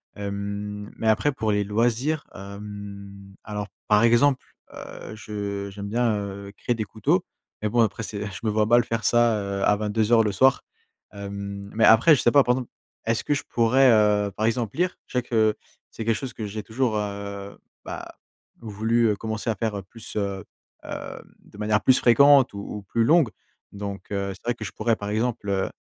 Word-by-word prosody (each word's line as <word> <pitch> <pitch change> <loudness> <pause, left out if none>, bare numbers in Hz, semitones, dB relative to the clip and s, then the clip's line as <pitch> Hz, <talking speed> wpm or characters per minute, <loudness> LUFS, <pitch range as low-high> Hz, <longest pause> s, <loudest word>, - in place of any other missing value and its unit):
hem, 100 +1 -5
mais 110 - -2
après, 110 +7 +3
pour 110 -5 -1
les 105 0 +1
loisirs, 120 +8 0
hem, 100 0 -9
alors 105 -1 -4 0.2
par 105 +1 +4
exemple, 125 +4 +4 0.3
heu, 110 - -9
je 100 -2 -5
j'aime 100 +1 -7
bien, 115 +2 +1
heu, 100 0 -6
créer 120 - -1
des 110 - -2
couteaux, 110 +1 0 0.4
mais 105 - 0
bon, 120 - 0
après 110 0 0
c'est 105 -1 -5
je 95 -2 -8
me 110 - +1
vois 105 0 +2
mal 120 +2 +5
faire 115 -1 -3
ça 105 -5 +2
à 105 - +4
22:00 110 +2 +2
le 105 - 0
soir, 130 +7 +4 0.5
hem, 100 0 -6
mais 110 - +4
après, 115 +9 +7
je 130 - -1
sais 120 - +3
pas, 140 +1 +6
par 125 0 +2
exemple, 125 -2 -5 0.4
est-ce 115 0 0
que - - +1
je 145 - -3
pourrais, 125 +3 +4
heu, 105 -2 +3
par 110 - -1
exemple 115 -2 -1
lire? 180 +1 0
Je - - -16
sais - - -2
que 110 -3 +2 0.4
c'est 115 - -6
quelque 115 0 +2
chose 130 -1 -5
que 110 - -5
j'ai 105 +1 -5
toujours, 115 0 -1
heu, 100 -1 -5 0.3
bah, - - -7 0.4
voulu 110 +1 +1
commencer 110 +2 -4
à - - -3
faire 105 -4 -3
plus, 110 +4 -11
heu, 100 -2 -2 0.4
hem, - - -7 0.2
de - - -17
manière 105 0 +1
plus 130 +4 +5
fréquente 135 +1 +6
ou - - -7
ou 105 +1 -6
plus 105 +4 0
longue, 155 0 +4 0.4
donc, 100 0 -7
heu, 100 -1 -2
c'est 95 - -16
vrai 120 0 0
que 110 - -7
je - - -5
pourrais 115 +1 0
par 100 -1 -6
exemple, 110 0 -1
heu, 95 -1 0
105 Hz, 195 wpm, -24 LUFS, 100-115 Hz, 0.5 s, après